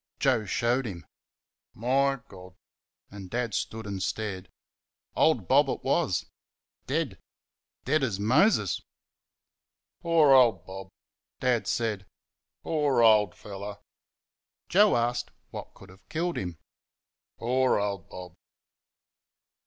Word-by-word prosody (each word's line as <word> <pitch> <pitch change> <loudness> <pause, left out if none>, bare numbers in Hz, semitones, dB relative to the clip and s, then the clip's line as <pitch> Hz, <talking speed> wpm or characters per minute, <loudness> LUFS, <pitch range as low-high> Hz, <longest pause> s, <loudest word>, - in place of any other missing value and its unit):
Joe 125 -6 +2
showed 120 +5 0
him. 90 -5 -8 0.7
"My 135 +4 +1
God!" 90 -1 -13 0.6
and 100 -2 -9
Dad 120 -1 -2
stood 110 +2 -3
and 100 -2 -4
stared. 95 -2 -3 0.7
Old 125 - +2
Bob 135 +1 +4
it - - -3
was 135 - +1 0.6
dead. - - -2 0.7
Dead 155 - +2
as 110 -8 -1
Moses. 135 - +3 1.2
"Poor 165 -4 +4
old 120 -9 +5
Bob!" 95 0 -8 0.5
Dad 125 -3 +1
said. 105 -5 -1 0.6
"Poor 145 -6 +2
old 105 -4 +5
fellow!" 100 0 -8 0.9
Joe 205 +4 +5
asked 120 +1 -1 0.2
what - - -8
could 95 - -15
have 95 +2 -19
killed 170 +3 -2
him? 90 -3 -5 0.8
"Poor 130 +2 +2
old 100 -3 -3
Bob!" 90 -1 -9
115 Hz, 110 wpm, -27 LUFS, 95-135 Hz, 1.2 s, old